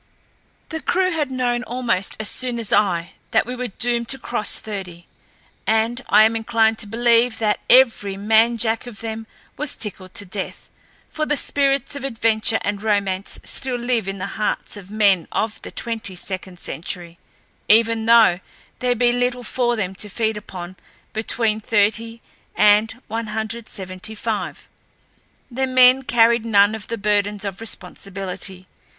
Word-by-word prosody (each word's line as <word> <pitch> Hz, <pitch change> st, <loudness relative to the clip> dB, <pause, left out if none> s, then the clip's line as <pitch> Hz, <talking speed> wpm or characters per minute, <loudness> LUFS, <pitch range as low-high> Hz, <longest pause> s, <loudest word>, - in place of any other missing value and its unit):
The 320 Hz, -1 st, -5 dB
crew 370 Hz, +3 st, +1 dB
had 305 Hz, -5 st, -1 dB
known 250 Hz, -2 st, 0 dB
almost 240 Hz, -6 st, -1 dB
as 220 Hz, -, +1 dB
soon 250 Hz, +1 st, -1 dB
as 230 Hz, -3 st, -2 dB
I 175 Hz, -4 st, +2 dB, 0.2 s
that -, -, +2 dB
we 250 Hz, +2 st, -5 dB
were 250 Hz, 0 st, -3 dB
doomed 235 Hz, +2 st, -1 dB
to 270 Hz, -, +3 dB
cross 240 Hz, -4 st, +2 dB
thirty, 185 Hz, -5 st, -7 dB, 0.6 s
and 225 Hz, +3 st, +1 dB
I 215 Hz, -, +7 dB
am 220 Hz, +1 st, +3 dB
inclined 225 Hz, -1 st, +2 dB
to 215 Hz, -, -3 dB
believe 235 Hz, +1 st, +3 dB
that 210 Hz, -2 st, +1 dB
every 230 Hz, -6 st, +4 dB
man 225 Hz, +3 st, +3 dB
jack 225 Hz, +1 st, -1 dB
of 225 Hz, -4 st, -10 dB
them 225 Hz, 0 st, -5 dB, 0.3 s
was 300 Hz, -1 st, -1 dB
tickled 190 Hz, -4 st, -7 dB
to 205 Hz, -, -2 dB
death, 190 Hz, +1 st, -6 dB, 0.4 s
for 310 Hz, -1 st, -2 dB
the 295 Hz, -, +1 dB
spirits 275 Hz, -1 st, +1 dB
of 280 Hz, -, -6 dB
adventure 225 Hz, -3 st, +2 dB
and 205 Hz, 0 st, -2 dB
romance 200 Hz, -3 st, -1 dB
still 260 Hz, -1 st, -1 dB
live 240 Hz, -4 st, -1 dB
in 195 Hz, 0 st, -3 dB
the 185 Hz, -, -4 dB
hearts 210 Hz, +1 st, -2 dB
of 195 Hz, -2 st, -9 dB
men 200 Hz, -5 st, +3 dB
of 220 Hz, 0 st, -2 dB
the -, -, -8 dB
twenty 225 Hz, -5 st, -4 dB
second 185 Hz, 0 st, -5 dB
century, 170 Hz, 0 st, -6 dB, 0.5 s
even 225 Hz, +1 st, +4 dB
though 225 Hz, -6 st, +6 dB, 0.4 s
there 250 Hz, -1 st, +1 dB
be 240 Hz, +1 st, +3 dB
little 245 Hz, 0 st, -1 dB
for 240 Hz, +1 st, 0 dB
them 190 Hz, -4 st, -2 dB
to 205 Hz, +2 st, -3 dB
feed 220 Hz, +2 st, -1 dB
upon 185 Hz, -3 st, -8 dB, 0.4 s
between 220 Hz, 0 st, 0 dB
thirty 225 Hz, +2 st, 0 dB, 0.3 s
and 210 Hz, +3 st, +4 dB
one 225 Hz, +1 st, -3 dB
hundred 220 Hz, +1 st, -4 dB
seventy 185 Hz, +3 st, -7 dB
five. 220 Hz, -1 st, -4 dB, 0.8 s
The 265 Hz, +2 st, -1 dB
men 255 Hz, 0 st, +6 dB
carried 235 Hz, -2 st, +3 dB
none 205 Hz, -2 st, +4 dB
of 220 Hz, -2 st, -6 dB
the 230 Hz, -, -3 dB
burdens 205 Hz, -1 st, 0 dB
of 195 Hz, +1 st, -5 dB
responsibility. 190 Hz, -2 st, -4 dB
220 Hz, 160 wpm, -21 LUFS, 200-240 Hz, 0.8 s, I